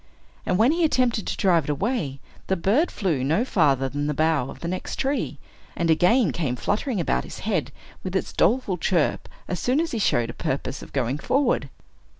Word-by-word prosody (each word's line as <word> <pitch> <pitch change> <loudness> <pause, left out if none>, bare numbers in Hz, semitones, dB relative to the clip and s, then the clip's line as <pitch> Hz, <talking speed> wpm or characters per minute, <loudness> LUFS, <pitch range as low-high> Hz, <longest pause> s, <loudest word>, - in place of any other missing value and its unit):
And 180 - +2
when 230 +6 +5
he 340 +2 +1
attempted 250 -8 +1
to - - -2
drive 170 -6 +3
it - - -6
away, 150 - -1 0.3
the 190 - +2
bird 210 - +2
flew 165 -11 -1
no 160 - +2
farther 140 - +2
than 145 +2 -3
the 150 - -1
bough 155 -4 +1
of - - -10
the 170 - -3
next 185 +2 -4
tree, 275 +1 -1 0.4
and 170 -1 +2
again 180 - +4
came 135 -5 -2
fluttering 210 - -1
about 170 - 0
his - - -9
head, 175 - -1 0.3
with 185 0 -4
its 190 - -1
doleful 210 -7 +2
chirp, 170 -2 0 0.2
as 180 - -3
soon 255 - +1
as 330 0 -1
he 230 - -2
showed 120 - +1
a - - -13
purpose 135 0 -3
of - - -11
going 135 +1 -1
forward. 255 - +1
180 Hz, 200 wpm, -24 LUFS, 145-230 Hz, 0.4 s, when